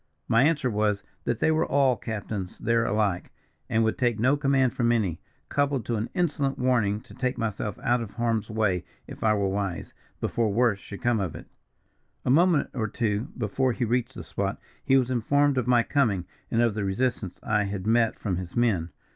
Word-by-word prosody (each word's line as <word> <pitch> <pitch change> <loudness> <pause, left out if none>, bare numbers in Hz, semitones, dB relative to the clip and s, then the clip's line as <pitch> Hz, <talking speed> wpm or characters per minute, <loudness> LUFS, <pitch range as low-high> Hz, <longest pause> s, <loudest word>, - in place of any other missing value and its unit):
My 115 - +4
answer 145 -2 +2
was, 105 -3 0 0.2
that 120 - 0
they 160 - +2
were 160 - +2
all 135 -2 +3
captains 105 -4 -5
there 115 0 +1
alike, 105 -5 0 0.4
and 115 +1 +2
would 110 - 0
take 120 -4 +1
no 130 +5 +4
command 135 -3 +2
from 120 -1 +1
any, 100 -9 0 0.3
coupled 140 -5 0
to 120 - -1
an 110 +3 -3
insolent 145 -6 0
warning 110 -5 +1
to - - -15
take 125 0 -2
myself 105 -3 -3
out 120 0 +2
of 115 - -5
harm's 115 -2 0
way 105 -5 0 0.2
if - - -9
I 110 -1 +4
were 100 -1 +1
wise, 95 -3 -3 0.3
before 115 -3 0
worse 115 -1 +2
should 100 +1 -10
come 120 -2 +2
of 95 -6 -3
it. - - -9 0.8
"A - - +3
moment 165 +1 +4
or 115 -4 -1
two 110 -1 -1
before 125 +3 0
he 120 - -1
reached 120 +2 -1
the - - -7
spot, 100 0 -3 0.2
he 135 - +4
was 130 -1 +1
informed 140 +3 +2
of 125 - -2
my 120 -1 +4
coming, 110 - +1 0.2
and 115 +1 +2
of 115 -3 +2
the 105 -1 -2
resistance 100 -1 -1
I 105 -1 +1
had 100 -1 -4
met 115 0 +2
from 95 -5 -2
his 90 -1 -7
men. 105 -9 +1
115 Hz, 200 wpm, -26 LUFS, 105-125 Hz, 0.8 s, My